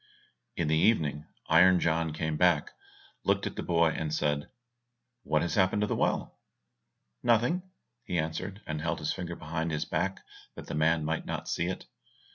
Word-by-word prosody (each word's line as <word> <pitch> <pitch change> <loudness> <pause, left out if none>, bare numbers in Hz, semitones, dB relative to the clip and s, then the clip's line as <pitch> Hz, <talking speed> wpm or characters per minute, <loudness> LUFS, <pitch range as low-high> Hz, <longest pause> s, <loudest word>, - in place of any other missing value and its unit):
In - - -1
the 80 - +3
evening 75 -6 +2 0.2
Iron 90 +3 +6
John 80 -1 +1
came 80 0 -2
back, 85 -2 +3 0.5
looked - - +1
at - - -4
the - - -3
boy, 85 -1 +3
and 80 -1 -3
said, 75 -1 0 0.7
"What 75 -5 +1
has 85 - -2
happened 95 +1 +3
to 105 - +2
the - - -1
well?" - - -1 0.8
"Nothing, 120 +4 +3
nothing," 185 +1 -13 0.4
he 90 - -1
answered, 85 +6 -3
and 75 -1 -3
held 80 +1 -1
his 75 0 -1
finger 85 -2 -5
behind 80 +1 -3
his 75 -1 -2
back, 95 +1 -1 0.3
that - - -8
the - - -6
man 80 +1 +2
might 80 +1 -2
not - - -4
see 85 - -1
it. 95 - -4
80 Hz, 180 wpm, -29 LUFS, 80-90 Hz, 0.8 s, Iron